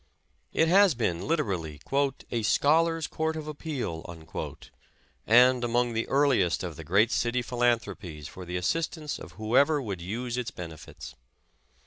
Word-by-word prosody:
It 160 - +3
has 190 -2 +5
been 90 -8 -1
literally 95 - -1 0.5
*'a 115 - 0
scholars' 160 +8 +3
court 160 +1 -2
of 155 -1 -5
appeal/' 145 - -4 1.2
and 125 +2 +6
among 120 0 +1
the 115 0 -1
earliest 135 - +2
of 85 -3 -5
the 80 - -8
great 100 - +3
city 120 +1 0
philanthropies 115 - -1
for 95 - -10
the 90 0 -4
assistance 155 - -2
of - - -11
whoever 140 +8 +3
would 100 -9 -5
use 120 +7 -4
its 120 -2 -3
benefits. 85 - -9
120 Hz, 135 wpm, -28 LUFS, 95-145 Hz, 1.2 s, and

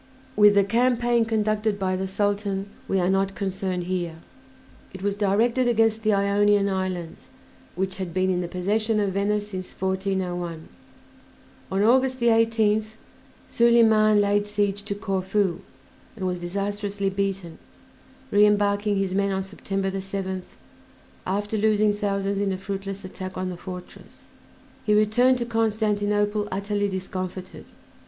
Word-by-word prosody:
With 210 -1 +6
the 200 - +5
campaign 240 +2 +2
conducted 215 -1 0
by 185 -1 -1
the 190 +1 -2
Sultan 200 0 -1 0.2
we 195 - +1
are 180 - +1
not 195 +1 +1
concerned 190 -2 -2
here; 175 -2 -3 0.8
it 190 - -8
was 200 0 0
directed 225 +5 +2
against 225 -1 +2
the 215 -1 +2
Ionian 200 0 +3
Islands, 185 -3 -4 0.5
which 190 +1 -2
had 185 -3 -4
been 185 +2 +1
in 180 -1 0
the 175 - -3
possession 210 +5 0
of 200 -2 0
Venice 205 +1 0
since 185 -2 -6
1401. 185 -3 -2 1.0
On 195 +1 +1
August 255 +3 +3
18th 225 -2 +2 0.5
Soliman 220 -3 +4
laid 205 0 +2
siege 205 -1 0
to 200 - -3
Corfu, 195 -2 -1 0.6
and 195 -4 -4
was 180 -1 -1
disastrously 200 +2 -2
beaten, 195 -4 -3 0.7
re 205 +1 +5
embarking 205 0 +2
his 195 -1 -1
men 200 0 +1
on 190 0 -1
September 195 0 -3
7th, 190 -1 -5 0.7
after 205 +3 -1
losing 215 0 +3
thousands 200 -1 -1
in 200 -1 0
a 190 - -2
fruitless 195 0 -5
attack 185 0 -7
on 185 0 -2
the - - -6
fortress. 180 +1 -10 0.6
He 210 -1 +2
returned 245 +5 +4
to 240 - -2
Constantinople 210 -2 0
utterly 205 +1 -1
discomfited. 185 -1 -6
200 Hz, 135 wpm, -24 LUFS, 190-210 Hz, 1.0 s, With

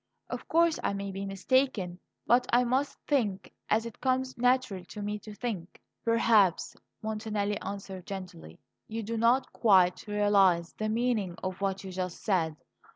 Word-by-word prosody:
Of - - -5
course 335 0 +3
I - - +1
may 200 0 -4
be 195 +1 -5
mistaken; 195 -3 0 0.3
but 245 +2 +4
I 245 +1 +5
must 260 +4 0
think 210 -10 0 0.2
as 220 +1 +2
it 230 - -9
comes 260 0 0
natural 250 -6 +1
to 210 - -8
me 210 +1 -3
to 210 0 -10
think." 205 -7 -5 0.2
"Perhaps," 225 -5 +3 0.3
Montanelli 215 -1 -2
answered 195 -2 -6
gently, 180 - -8 0.3
"you 225 +1 -4
do 230 +3 -3
not 235 +4 +2
quite 185 -4 +4
realize 200 -5 +3
the 215 0 -3
meaning 220 -5 0
of 185 0 -4
what 195 -1 -1
you 190 - -7
just 185 -1 -4
said. 165 -7 +1
205 Hz, 155 wpm, -29 LUFS, 190-235 Hz, 0.3 s, I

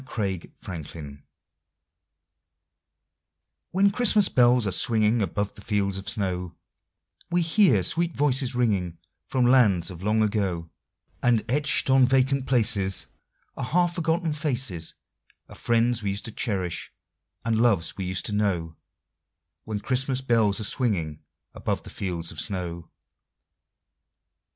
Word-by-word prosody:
CHRISTMAS 100 -8 -4
FANCIES 75 -4 -8 2.5
When 195 +2 +3
Christmas 210 -3 +3
bells 125 -1 +4
are 100 - 0
swinging 110 +3 +2
above 100 0 -2
the - - -12
fields 100 -2 -1
of 95 - -6
snow, 90 -4 -3 0.7
We 175 0 +1
hear 165 - +3
sweet 170 - 0
voices 135 -4 +1
ringing 100 -9 0 0.3
from 125 -2 +1
lands 105 -9 +4
of 85 -1 -10
long 110 +2 +2
ago, 95 -6 -2 0.5
And 120 -3 +2
etched 140 +1 +3
on 130 -1 +5
vacant 135 +1 +1
places 105 -6 +1 0.5
Are - - -5
half 175 +6 +1
forgotten 165 -1 0
faces 130 - -2 0.5
Of - - -12
friends 120 0 +1
we 100 - -2
used 100 +2 -3
to 110 - -4
cherish, 95 -6 -3 0.5
and 115 -1 +1
loves 100 -9 +2
we 95 - -4
used 90 0 -1
to 105 - -1
know— 90 -6 -1 0.9
When 110 -2 -3
Christmas 130 +1 0
bells 115 -5 +2
are - - -3
swinging 95 - -1 0.3
above - - -3
the - - -10
fields 85 -4 -4
of 80 - -8
snow. 85 -3 -5
110 Hz, 130 wpm, -25 LUFS, 95-130 Hz, 2.5 s, on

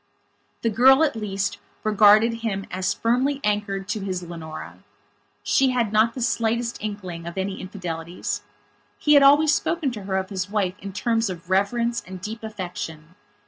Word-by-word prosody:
The 230 - +2
girl, 265 +7 +6
at 300 - +1
least, 200 -2 -2 0.2
regarded 215 +2 +5
him 195 -4 -2
as 185 0 -1
firmly 255 +5 +1
anchored 205 -2 -1
to 210 - -1
his 185 -2 -3
Leonora. 165 -2 -8 0.6
She 270 -1 +3
had 240 -4 0
not 220 +2 +3
the 250 - -2
slightest 235 0 0
inkling 185 -5 -5
of 170 - -7
any 190 0 -3
infidelities. 175 -3 -5 0.6
He 300 - +3
had 285 - +8
always 290 +2 +6
spoken 325 -5 0
to 210 -5 -7
her 190 -1 -1
of 190 +1 -3
his 190 0 -3
wife 200 -3 0
in 200 0 -7
terms 225 +2 0
of 175 0 -8
reverence 235 +5 +1
and 185 0 -8
deep 220 +4 -6
affection. 180 -6 -6
210 Hz, 165 wpm, -24 LUFS, 190-235 Hz, 0.6 s, had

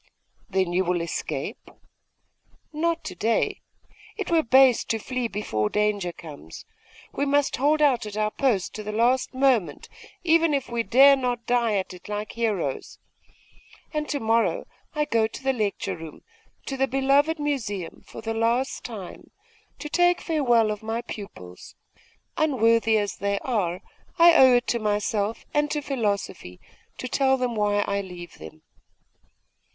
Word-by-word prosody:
'Then 190 -3 0
you 185 +1 +2
will 180 -1 0
escape?' 170 0 -5 1.0
'Not 335 +2 -1
to 185 - -6
day. 225 +6 0 0.6
It - - -4
were 330 -1 +4
base 260 -1 +5
to 225 - -1
flee 250 +2 -3
before 110 - -2
danger 210 -4 0
comes. 150 - -11 0.5
We - - -1
must 285 0 +1
hold 300 +3 +2
out 255 -7 +2
at 210 0 -7
our 215 0 0
post 230 -9 0
to 215 - -6
the 210 0 -5
last 240 +4 +1
moment, 245 - +1 0.3
even 330 -2 +3
if 275 -2 -2
we 235 -1 -1
dare 270 +4 +6
not 245 -3 -2
die 235 -3 +1
at 190 -1 -2
it 180 +2 -13
like 210 0 -4
heroes. 205 - -2 1.0
And 300 0 -2
to 285 - -1
morrow 225 0 +1 0.3
I 300 0 +1
go 225 -5 +1
to 225 - -10
the 265 0 +2
lecture 215 -5 -2
room, 160 -2 -11 0.4
to 270 - -4
the 270 +1 +2
beloved 275 +5 +2
Museum, 225 - -3
for - - -10
the 225 0 -3
last 235 +4 0
time, 205 -7 -9 0.5
to - - -6
take 350 +3 +3
farewell 240 -9 +2
of 210 - -5
my 225 +2 -3
pupils. 90 - -10 0.6
Unworthy 230 -6 +3
as 205 -2 -2
they 200 0 -1
are, 185 -8 -2 0.3
I 340 0 +8
owe 260 -5 +7
it 245 - +2
to 235 - +1
myself 210 0 -1
and 295 0 +1
to 300 - -1
philosophy 205 - -3 0.4
to 255 - -5
tell 265 +1 +2
them 250 -2 -2
why 205 -1 +1
I 200 0 -1
leave 180 -2 -10
them. 80 0 -12
230 Hz, 155 wpm, -25 LUFS, 205-270 Hz, 1.0 s, I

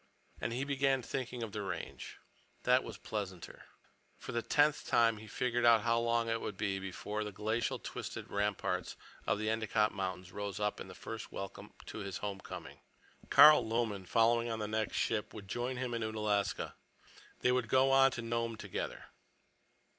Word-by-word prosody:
And - - -2
he 125 +3 -1
began 135 -2 +1
thinking 125 -1 -4
of 110 - -5
the 105 0 -3
Range. 100 - -6 0.5
That 125 +1 +4
was 110 -3 -7
pleasanter. 95 -5 -6 0.5
For - - -7
the 120 -1 0
tenth 145 +4 +2
time 115 -2 +4
he 110 +1 -10
figured 120 +2 0
out 115 -2 +7
how 115 +1 +3
long 115 0 +1
it 115 0 0
would 100 - -4
be 100 -2 -1
before 105 +3 -4
the 105 - -5
glacial 110 +3 -1
twisted - - -6
ramparts 100 0 -1 0.3
of 100 - +2
the 110 +1 -2
Endicott 110 -1 +1
Mountains 95 -2 -4
rose 100 0 -4
up 105 0 -1
in - - -8
first - - -7
welcome 100 +1 -7
to - - -7
his 100 -3 -4
home 100 0 -4
coming. - - -8 0.5
Carl 155 0 +9
Lomen, 110 -4 -1
following 115 +2 +3
on 115 - -2
the 105 -1 -3
next 110 0 -1
ship, 110 -2 -1
would 100 -2 -8
join 120 +5 -2
him 125 -1 -2
at 115 - -2
Unalaska. 105 -2 -1 0.7
They 125 - +4
would 125 -2 +1
go 130 +2 +5
on 135 0 +7
to 115 - -4
Nome 115 0 -1
together. - - -5
110 Hz, 175 wpm, -34 LUFS, 105-120 Hz, 0.7 s, Carl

